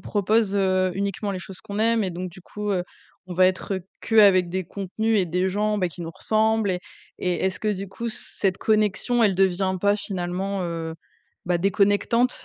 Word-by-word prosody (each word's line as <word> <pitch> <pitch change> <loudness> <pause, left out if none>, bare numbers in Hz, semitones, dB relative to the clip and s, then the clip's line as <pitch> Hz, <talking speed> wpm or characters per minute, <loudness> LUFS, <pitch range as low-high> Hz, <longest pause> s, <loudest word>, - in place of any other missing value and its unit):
proposent, 205 0 +1
heu, 185 -1 +2
uniquement 200 +1 -2
les 190 - -3
choses 190 0 -10
qu'on 200 +2 -6
aime? 230 0 +3
Et 190 - -1
donc 180 +1 -5
du 185 +2 -14
coup, 210 +3 -5
heu, 180 -2 0 0.4
on 180 - -6
va 185 +1 +5
être, 185 +2 -1
heu, - - -4 0.2
qu'avec 200 -5 +5
des 185 +1 -2
contenus 205 +4 -1
et 180 - 0
des 180 +3 0
gens, 210 +2 0
bah, 185 - +1
qui 175 0 -9
nous 165 -1 -5
ressemblent? 215 +2 +1
Et 180 - -3 0.4
et 180 -1 0
est-ce 190 -1 -1
que 215 - -1
du 195 0 -5
coup, 235 +5 -5
cette 195 -3 -2
connexion, 215 +3 +2
elle 205 -4 +4
devient 190 0 +2
pas 200 +1 +3
finalement, 190 -1 -3
heu, 165 -1 -4 0.5
bah, 175 0 +2
déconnectante, 205 +6 +2
195 Hz, 200 wpm, -24 LUFS, 185-210 Hz, 0.5 s, va